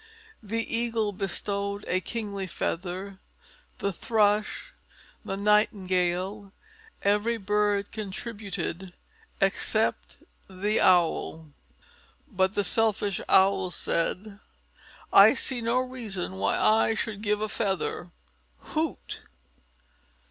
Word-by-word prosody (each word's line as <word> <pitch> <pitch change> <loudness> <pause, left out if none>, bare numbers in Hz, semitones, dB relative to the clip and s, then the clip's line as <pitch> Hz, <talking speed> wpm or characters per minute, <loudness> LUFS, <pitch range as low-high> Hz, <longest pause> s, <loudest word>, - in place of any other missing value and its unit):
The 225 +2 -2
Eagle 230 -2 0
bestowed 200 +1 -3
a 185 - +1
kingly 200 -4 -4
feather, 185 +3 -4 0.6
the 200 -1 -2
Thrush, 215 - +1 0.5
the 195 - -4
Nightingale, 195 -1 +1 0.5
every 210 +3 +2
bird 205 0 0
contributed 200 -3 -5 0.5
except - - 0 0.3
the 200 +3 0
Owl. 165 -3 +2 0.8
But 190 -5 0
the 205 - +2
selfish 205 -1 +1
Owl 190 -1 +4
said, 195 +4 -2 0.7
"I 205 +6 +9
see 260 -2 -1
no 230 +2 +1
reason 230 - -3
why 100 +1 +1
I 220 +1 +4
should 215 -1 -3
give 210 -1 +1
a 215 - -1
feather. 195 -4 -2 0.6
Hoot! - - -2
200 Hz, 95 wpm, -27 LUFS, 190-215 Hz, 0.8 s, I